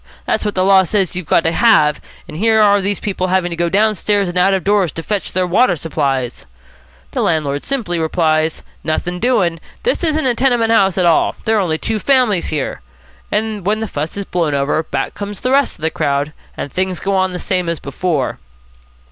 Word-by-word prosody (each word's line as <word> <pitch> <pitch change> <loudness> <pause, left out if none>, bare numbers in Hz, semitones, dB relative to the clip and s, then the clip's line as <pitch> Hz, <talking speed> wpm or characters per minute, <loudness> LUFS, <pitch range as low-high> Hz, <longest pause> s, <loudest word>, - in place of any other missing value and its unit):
That's - - 0
what 210 -1 -2
the 185 - +2
law 195 -1 +6
says 190 0 0
you've 180 -4 -5
got - - +3
to 165 - +1
have, 155 -8 +3 0.3
and 150 - -9
here 220 +5 +2
are 205 -1 +4
these 200 0 -2
people 190 -2 -2
having 185 -1 0
to - - -3
go 170 0 0
downstairs 205 0 +1
and 175 - -5
out 195 +2 +3
of 190 - -2
doors 200 -5 +2
to 165 - -6
fetch 205 0 -3
their 185 0 0
water 180 +2 +3
supplies,' 140 -6 -2 0.6
the - - -2
landlord 145 -3 0
simply 215 -11 -1
replies, 160 -1 0 0.2
'Nothing 175 +3 -2
doing. 190 -9 +1 0.2
This 480 -5 0
isn't 315 -3 +1
a 250 - +3
tenement 240 -2 +1
house 195 -5 +3
at 180 - +2
all. 170 -2 +3
There 220 0 +2
are - - +2
only 160 -4 0
two 220 +6 -2
families 250 -8 +2
here.' 145 - -3 0.5
And 215 -2 -1
when 210 +4 0
the 220 - -3
fuss 150 -3 -4
has 200 0 -4
blown 165 -6 -1
over, 140 +3 +1
back 140 -4 -3
come 205 0 -6
the 250 +6 -3
rest 275 0 +2
of 160 - -15
the 160 - +1
crowd, 140 +1 -1 0.2
and 140 - -5
things 185 -1 -1
go 195 0 -1
on 185 0 +1
the - - -3
same 180 -1 -1
as 170 - -2
before." 140 0 -2
185 Hz, 215 wpm, -17 LUFS, 160-210 Hz, 0.6 s, law